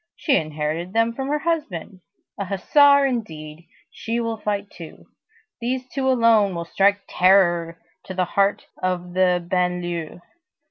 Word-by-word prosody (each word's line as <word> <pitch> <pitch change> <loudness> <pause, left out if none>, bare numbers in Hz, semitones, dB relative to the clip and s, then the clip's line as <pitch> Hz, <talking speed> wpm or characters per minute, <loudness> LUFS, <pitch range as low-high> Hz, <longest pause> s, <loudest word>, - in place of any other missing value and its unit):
She 285 -5 +1
inherited 155 - -2
them 230 +1 +2
from 265 +3 -4
her 295 +2 0
husband. 280 - -3 0.4
A 200 - -2
hussar 280 +9 +4
indeed! 165 - -5 0.2
She 230 +1 -3
will 230 -1 -2
fight 205 -1 -3
too. 165 -2 -12 0.5
These 250 +2 -3
two 265 0 -1
alone 230 -6 +3
will 170 0 -4
strike 200 +3 +2
terror 175 -3 +3 0.3
to 185 - -7
the 185 0 +1
heart 200 +3 0 0.2
of 180 -1 -2
the 180 -2 +1
banlieue. 175 -2 -2
195 Hz, 140 wpm, -22 LUFS, 175-230 Hz, 0.5 s, hussar